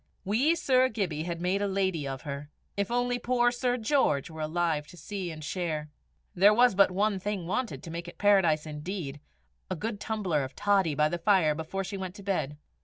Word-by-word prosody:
Wee 250 - +3
Sir 260 -4 +3
Gibbie 175 -9 -2
had 170 -1 -3
made 185 +3 0
a 205 - +1
lady 190 -6 0
of 135 -1 -5
her! 145 0 -6 0.3
If 200 -1 -1
only 245 0 0
poor 240 0 +2
Sir 245 0 0
George 220 - +1
were 160 0 -7
alive 155 -1 0
to 175 - -14
see 190 +2 -5
and 155 -1 -8
share! 155 -3 -3 0.4
There 200 +4 +6
was 245 0 +5
but 195 +1 +5
one 200 +2 +1
thing 200 -2 -3
wanted 225 +7 -2
to 165 - -7
make 170 +1 -5
it 175 - -10
Paradise 190 -7 +4
indeed 150 -1 -5 0.5
a 185 - -1
good 210 +4 -4
tumbler 195 -11 -1
of 130 0 -7
toddy 195 -7 +2
by 150 +1 +3
the 170 +3 -3
fire 170 -4 +4
before 160 +5 -4
she 195 +1 -5
went 190 -1 -5
to 200 - -11
bed! 165 -7 -1
185 Hz, 205 wpm, -29 LUFS, 155-210 Hz, 0.5 s, There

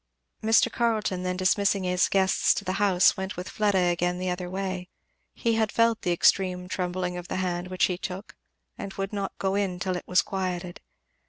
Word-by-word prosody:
Mr. 225 +2 +4
Carleton 220 -6 0
then 180 0 -2
dismissing 195 +1 +2
his 180 0 +2
guests 190 -1 +3
to 200 - -4
the 185 - -1
house, 190 -2 +4
went 190 -1 -5
with 180 +1 -5
Fleda 205 -2 +1
again 175 +1 0
the 185 0 -2
other 180 0 -4
way. 185 -1 -4 0.5
He 230 - 0
had 220 -1 +1
felt 230 -1 +2
the 175 - 0
extreme 180 +1 +2
trembling 180 -1 -2
of 175 0 -7
the - - -4
hand 180 -1 -2
which 185 0 +1
he 180 -1 -2
took, 190 +2 -6 0.4
and 200 - -5
would 195 +1 -4
not 200 -1 -4
go 190 0 -1
in 195 -3 -1
till 185 0 -1
it 180 - -6
was 180 0 +3
quieted. 180 -2 -4
185 Hz, 195 wpm, -26 LUFS, 180-200 Hz, 0.5 s, Mr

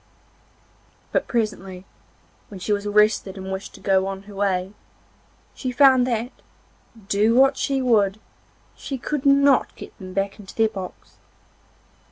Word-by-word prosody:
But - - 0
presently, 195 -6 -3 0.6
when 195 - -10
she 210 +3 -1
was 205 0 -2
rested 210 -2 +2
and 190 0 -6
wished 190 +1 -6
to - - -13
go 190 -1 +1
on 195 0 -5
her 205 0 -13
way, 195 -1 -1 0.8
she 255 - -4
found 260 -1 +5
that, 240 +1 -2 0.8
do 215 +2 +2
what 270 +2 +5
she 270 -1 -1
would, 210 -4 +2 0.6
she 270 - -6
could 280 +2 -2
not 280 -1 +4
get - - -11
them 185 -1 -9
back 195 +2 -2
into 195 -2 -12
their 225 -1 +3
box. 190 -4 -9
210 Hz, 145 wpm, -23 LUFS, 195-250 Hz, 0.8 s, found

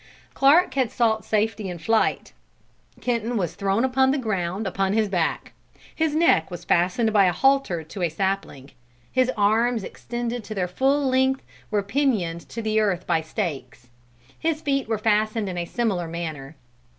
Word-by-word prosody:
Clark 295 +7 +4
had 260 -3 +1
sought 220 -2 +1
safety 215 -2 -1
in 175 - -5
flight. 225 +6 0 0.7
Kenton 235 -1 -1
was 175 -6 -1
thrown 200 +5 0
upon 265 0 +3
the 275 - +2
ground 195 -4 -2
upon 195 0 0
his 220 0 +2
back. 180 -5 -1 0.4
His 315 -2 0
neck 315 - +3
was 175 - -8
fastened 185 +6 +2
by 200 -2 +5
a 180 - +3
halter 270 -7 +2
to 180 +5 -8
a 175 - +1
sapling; 175 -6 -3 0.4
his 255 -1 +2
arms, 220 +2 +2
extended 240 +3 -5
to 215 - -6
their 185 -2 0
full 270 +9 +1
length, 265 +1 +2 0.3
were 210 -2 0
pinioned 200 -8 -1
to 230 - -5
the 215 0 +1
earth 195 -5 0
by 160 - +1
stakes; 135 - -5 0.5
his 320 -1 0
feet 275 -4 -1
were 220 -1 0
fastened 215 0 +1
in 185 - -4
a 170 - -2
similar 195 -5 -1
manner. 160 -4 -6
215 Hz, 165 wpm, -24 LUFS, 180-245 Hz, 0.7 s, by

